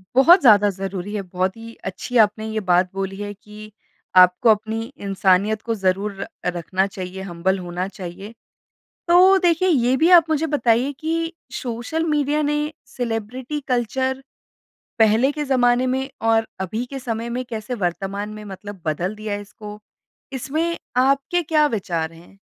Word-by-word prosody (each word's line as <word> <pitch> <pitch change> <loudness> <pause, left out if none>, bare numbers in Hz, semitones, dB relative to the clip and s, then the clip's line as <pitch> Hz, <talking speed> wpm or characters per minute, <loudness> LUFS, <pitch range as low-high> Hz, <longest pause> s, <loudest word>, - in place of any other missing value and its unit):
बहुत 335 +8 +7
ज़्यादा 210 -6 +6
ज़रूरी 195 0 -5
है। 205 - -1
बहुत 185 +1 -2
ही 230 0 -10
अच्छी 245 +6 -3
आपने 215 0 +3
ये 220 - -1
बात 180 +1 +4
बोली 195 0 -4
है 205 0 -5
कि 210 +1 -13 0.5
आपको 180 +6 +4
अपनी 220 +1 +1 0.2
इंसानियत 195 +2 +2
को 230 - 0
ज़रूर 195 +1 0
र - - -4 0.3
रखना 185 +3 0
चाहिए, 185 0 -6
हम्बल 190 +1 -1
होना 180 +1 -4
चाहिए। 190 +4 -8 0.7
तो 370 +3 +6
देखिए 340 +2 +2
ये 255 -5 +3
भी 325 +4 +3
आप 325 - -7
मुझे 315 0 +1
बताइए 245 0 +2
कि 330 +1 -2 0.3
सोशल 245 +7 -3
मीडिया 295 +1 +1
ने 295 - 0 0.4
सेलिब्रिटी 245 +4 -3
कल्चर 260 +2 -1 0.8
पहले 225 +5 +4
के 295 0 -3
ज़माने 250 -1 +2
में 265 +1 -3 0.2
और 225 0 +2
अभी 215 +6 -3
के 270 - -4
समय 235 -2 -4
में 255 - -2
कैसे 225 +1 -5
वर्तमान 195 +4 -3
में 215 0 -9
मतलब 200 -1 -9
बदल 175 +6 -2
दिया 215 -1 -5
है 205 - -3
इसको? 210 +1 -10 0.5
इसमें 310 +6 -2 0.2
आपके 275 +7 +2
क्या 305 -1 +3
विचार 170 - -3
हैं? 170 +4 -17
220 Hz, 155 wpm, -21 LUFS, 195-265 Hz, 0.8 s, बहुत